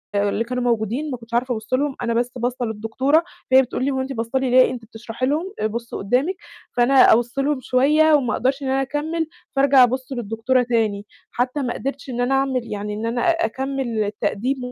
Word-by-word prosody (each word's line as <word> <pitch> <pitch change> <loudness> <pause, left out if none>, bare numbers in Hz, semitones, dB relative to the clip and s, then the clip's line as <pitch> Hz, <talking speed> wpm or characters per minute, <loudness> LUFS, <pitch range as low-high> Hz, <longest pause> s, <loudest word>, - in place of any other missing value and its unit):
اللي 205 +2 +1
كانوا 250 +1 -3
موجودين 240 +5 -1
ما 250 - -3
كنتش 230 0 -16
عارفة 245 +1 +1
أبُصّ 220 +2 -6
لهم، 275 +1 +1
أنا 235 -1 -1
بس 240 +1 0
باصّة 245 0 -2
للدكتورة، 230 +9 +1 0.3
فهي 260 - +8
بتقول 255 0 -3
لي 280 - +1
هو 265 0 -1
أنت 270 +1 -4
باصة 230 +3 -2
لي 260 -1 -1
ليه؟ 255 0 +6
أنتِ 245 -2 -7
بتشرحي 225 +2 -5
لهم 325 +8 -1 0.2
بُصّي 235 +1 -6
قُدّامِك 255 - 0 0.4
فأنا 250 +1 +5
أبُصّ 240 +3 0
لهم 280 0 +1
شوية 300 +6 +3
وما 250 -7 +2
أقدرش 265 +3 0
إن - - -3
أنا 270 +1 +1
أكمِّل، 310 +4 -2 0.3
فأرجع 270 -1 +6
أبُصّ 255 +2 -1
للدكتورة 240 +2 0
تاني، 220 -4 0 0.3
حتى 250 +4 -1
ما 250 -3 -2
قدرتش 275 0 -5
إن 245 0 -2
أنا 250 +2 +1
أعمل 270 -2 +1
يعني 210 0 -4
إن 215 +2 -4
أنا 235 +1 -1
أكمّل 265 -7 -2
التقديم 215 +5 -2
250 Hz, 200 wpm, -21 LUFS, 230-270 Hz, 0.4 s, فهي